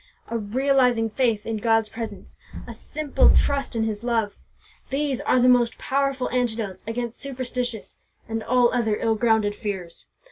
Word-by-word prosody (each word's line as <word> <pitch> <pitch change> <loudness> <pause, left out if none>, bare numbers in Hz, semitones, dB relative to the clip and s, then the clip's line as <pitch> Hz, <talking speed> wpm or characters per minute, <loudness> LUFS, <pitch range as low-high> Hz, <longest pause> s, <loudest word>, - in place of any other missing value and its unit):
A 230 - -1
realizing 250 0 +2
faith 225 -3 0
in 225 -1 -2
God's 225 0 +2
presence, 225 +1 -8 0.3
a - - -8
simple 305 -1 +1
trust 280 -3 +1
in 225 - +1
His 215 0 -3
love, 225 -4 0 0.5
these 275 -2 -1
are 255 - +2
the 250 - +4
most 245 -2 +4
powerful 275 -1 0
antidotes 225 -6 -2
against 235 0 -4
superstitious 250 -4 -4 0.3
and 225 0 -3
all 245 +1 +3
other 225 -4 +1
ill 225 - +1
grounded 220 -2 +2
fears. 195 -6 -6
235 Hz, 150 wpm, -24 LUFS, 220-255 Hz, 0.5 s, the